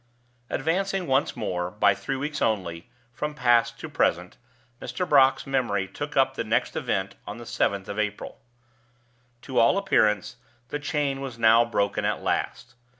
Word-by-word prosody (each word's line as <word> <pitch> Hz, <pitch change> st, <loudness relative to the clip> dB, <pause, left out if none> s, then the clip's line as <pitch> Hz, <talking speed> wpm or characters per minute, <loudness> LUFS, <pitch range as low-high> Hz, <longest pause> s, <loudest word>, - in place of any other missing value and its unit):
Advancing 185 Hz, +5 st, -1 dB
once 135 Hz, -1 st, +1 dB
more, 90 Hz, -1 st, -2 dB
by 105 Hz, +1 st, +3 dB
three 135 Hz, -, -4 dB
weeks 145 Hz, +3 st, -4 dB
only, 90 Hz, -3 st, -1 dB, 0.2 s
from 150 Hz, +4 st, -4 dB
past 120 Hz, -4 st, +2 dB
to -, -, -6 dB
present, -, -, 0 dB, 0.5 s
Mr. 130 Hz, +9 st, -3 dB
Brock's 135 Hz, -2 st, +4 dB
memory 120 Hz, -8 st, 0 dB
took -, -, -6 dB
up -, -, +4 dB
the -, -, -3 dB
next -, -, 0 dB
event 95 Hz, 0 st, -2 dB
on 105 Hz, -, -6 dB
the 120 Hz, -, -9 dB
seventh 100 Hz, -3 st, -1 dB
of 100 Hz, +1 st, -4 dB
April. 105 Hz, -1 st, -3 dB, 1.0 s
To 130 Hz, -2 st, -1 dB
all 115 Hz, -, +4 dB
appearance, 105 Hz, -, +1 dB, 0.3 s
the 145 Hz, -, -3 dB
chain 145 Hz, -2 st, -1 dB
was 130 Hz, -4 st, -6 dB
now 115 Hz, 0 st, +6 dB
broken 100 Hz, -3 st, -1 dB
at -, -, -1 dB
last. 125 Hz, -, -2 dB
120 Hz, 155 wpm, -25 LUFS, 100-140 Hz, 1.0 s, now